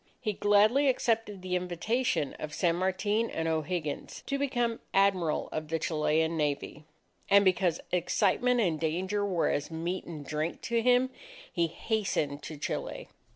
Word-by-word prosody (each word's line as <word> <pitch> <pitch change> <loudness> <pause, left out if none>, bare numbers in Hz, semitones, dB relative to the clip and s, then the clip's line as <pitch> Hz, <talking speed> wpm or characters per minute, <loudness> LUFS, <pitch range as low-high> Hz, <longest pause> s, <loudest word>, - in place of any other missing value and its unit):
He 215 -4 -1
gladly 210 +8 +4
accepted 225 -6 0
the 180 -1 -1
invitation 180 - 0
of 155 0 -5
San 170 -1 +2
Martin 205 +5 0
and 165 0 -2
O'Higgins, 160 -1 -3
to 275 - -2
become 240 -4 0 0.2
Admiral 190 -5 +2
of 155 0 -4
the 165 +1 -1
Chilean 160 +1 +1
Navy. 150 0 -2 0.4
And 200 0 +6
because 180 -2 +2
excitement 205 +7 +2
and 165 -7 +1
danger 185 +6 -1
were 185 -5 +1
as 145 - -2
meat 170 +3 -3
and 155 -4 -8
drink 155 +3 -3
to 235 -1 0
him, 250 +2 +3 0.4
he 170 -2 +2
hastened 160 -7 -1
to 155 +1 -7
Chile. - - -4
180 Hz, 150 wpm, -30 LUFS, 160-215 Hz, 0.4 s, And